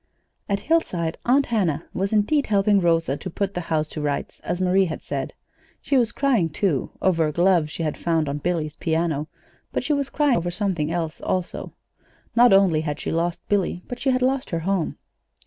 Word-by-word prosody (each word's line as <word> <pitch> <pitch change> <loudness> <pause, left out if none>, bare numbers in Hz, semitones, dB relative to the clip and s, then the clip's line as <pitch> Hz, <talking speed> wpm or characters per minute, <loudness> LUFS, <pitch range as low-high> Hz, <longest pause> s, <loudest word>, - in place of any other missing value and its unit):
At 200 0 0
Hillside, 180 - 0
Aunt 270 +3 +4
Hannah 175 -9 0
was, 195 +1 -1
indeed, 220 +8 +2
helping 200 -1 +3
Rosa 165 -5 +2
to 185 - -6
put 200 +3 -2
the 180 - -3
house 155 -2 +1
to 155 - -5
rights, 145 -1 -3
as 175 - -3
Marie 185 +1 +3
had 160 - -5
said. - - -4 0.5
She 280 - -1
was 240 -4 +3
crying, 245 - +1
too, 150 -3 0
over 165 -4 +3
a - - -2
glove 175 -1 +3
she 165 - -4
had 155 -2 -2
found 165 -3 +1
on 140 +1 -2
Billy's 155 -1 -2
piano; 160 -2 -1 0.4
but - - -2
she 300 +4 +1
was 280 -1 -1
crying 290 -5 +2
over 175 +1 -1
something 175 -5 -1
else, 165 -2 -3
also. 185 -1 -3 0.6
Not 240 +1 +6
only 190 -5 +5
had 150 -2 -3
she - - -3
lost 170 +1 -2
Billy, 185 -3 0
but 245 - -6
she 270 - 0
had 255 -1 +2
lost 265 +1 0
her 165 -1 -2
home. 185 -1 -1
180 Hz, 200 wpm, -23 LUFS, 160-210 Hz, 0.6 s, Not